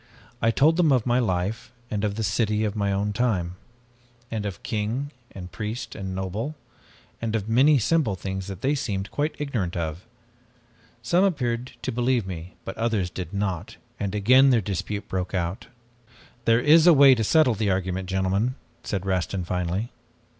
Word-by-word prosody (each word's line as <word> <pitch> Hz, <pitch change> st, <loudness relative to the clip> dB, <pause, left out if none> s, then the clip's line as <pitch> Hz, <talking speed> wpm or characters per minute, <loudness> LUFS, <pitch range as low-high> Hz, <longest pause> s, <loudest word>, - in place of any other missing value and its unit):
I 115 Hz, -, +3 dB
told 150 Hz, +8 st, +4 dB
them 165 Hz, -4 st, +4 dB
of 125 Hz, -4 st, +3 dB
my 125 Hz, 0 st, +2 dB
life, 110 Hz, +2 st, -1 dB, 0.2 s
and 105 Hz, -1 st, -2 dB
of 105 Hz, -1 st, 0 dB
the 110 Hz, -, -2 dB
city 105 Hz, +1 st, +1 dB
of 105 Hz, -1 st, -1 dB
my 100 Hz, -2 st, 0 dB
own 100 Hz, +1 st, -1 dB
time, 95 Hz, -7 st, 0 dB, 0.8 s
and 105 Hz, -2 st, -2 dB
of 90 Hz, -4 st, -7 dB
king 115 Hz, +5 st, -2 dB, 0.2 s
and 90 Hz, -2 st, -9 dB
priest 110 Hz, +5 st, -5 dB
and 95 Hz, -2 st, -5 dB
noble, 100 Hz, +10 st, -3 dB, 0.7 s
and 115 Hz, -1 st, -1 dB
of 105 Hz, -2 st, -2 dB
many 135 Hz, +6 st, +5 dB
simple 135 Hz, -3 st, +1 dB
things 95 Hz, 0 st, -5 dB
that 95 Hz, -3 st, -7 dB
they 140 Hz, +2 st, +2 dB
seemed 100 Hz, -8 st, -3 dB
quite 150 Hz, +1 st, -1 dB
ignorant 115 Hz, -12 st, -2 dB
of. 80 Hz, +1 st, -3 dB, 1.0 s
Some 175 Hz, +10 st, +3 dB
appeared 125 Hz, -9 st, -1 dB
to 130 Hz, -, -1 dB
believe 120 Hz, -2 st, +1 dB
me 90 Hz, -1 st, -7 dB
but 95 Hz, -, -5 dB
others 110 Hz, -6 st, 0 dB
did 90 Hz, -1 st, -6 dB
not, 100 Hz, -5 st, -3 dB, 0.2 s
and 100 Hz, 0 st, -2 dB
again 130 Hz, +7 st, +6 dB
their 125 Hz, -3 st, +4 dB
dispute 100 Hz, +1 st, -4 dB
broke 95 Hz, 0 st, -3 dB
out. 85 Hz, +1 st, -3 dB, 0.8 s
"'There 115 Hz, +1 st, +4 dB
is 155 Hz, +5 st, +6 dB
a 175 Hz, -, +9 dB
way 140 Hz, -2 st, +8 dB
to 115 Hz, -3 st, 0 dB
settle 155 Hz, +2 st, +4 dB
the 105 Hz, -1 st, -1 dB
argument, 95 Hz, 0 st, -1 dB
gentlemen,' 95 Hz, +6 st, 0 dB, 0.3 s
said 95 Hz, -3 st, -3 dB
Rastin 95 Hz, 0 st, -1 dB
finally. 90 Hz, +6 st, -2 dB
105 Hz, 175 wpm, -25 LUFS, 95-125 Hz, 1.0 s, a